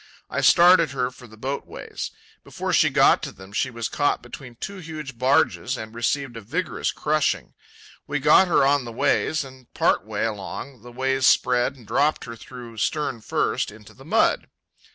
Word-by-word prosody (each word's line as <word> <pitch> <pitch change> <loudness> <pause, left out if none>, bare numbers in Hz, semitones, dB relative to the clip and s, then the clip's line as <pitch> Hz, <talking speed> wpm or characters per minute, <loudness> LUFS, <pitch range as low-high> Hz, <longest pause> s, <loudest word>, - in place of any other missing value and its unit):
I - - -1
started 175 -2 +6
her 125 -2 -1
for 125 -1 -14
the 110 0 -16
boat 135 +5 -4
ways. - - -6 0.3
Before - - -4
she - - +5
got - - +4
to - - -5
them 95 +1 -14
she 130 - 0
was 115 -2 -4
caught 145 -1 0
between 125 -4 -10
two 200 +11 -6
huge 155 -6 -7
barges 130 -1 +2
and 110 -1 -8
received 120 +2 -1
a 115 - -7
vigorous 160 - -2
crushing. 155 0 0 0.5
We 145 - -1
got 150 +6 +5
her 170 - +4
on 140 -1 +3
the 120 - -6
ways, 155 +6 +1
and, 130 -2 -14
part - - +2
way 105 0 -2
along, 110 +4 -6
the 120 +1 -12
ways 130 +1 +1
spread 125 +1 +3
and 125 -4 -16
dropped 140 +8 +1
her 115 - -7
through, 120 -1 -11
stern 130 +1 -1
first, - - -1
into 105 -1 -14
the - - -16
mud. - - +2
130 Hz, 185 wpm, -24 LUFS, 115-145 Hz, 0.5 s, started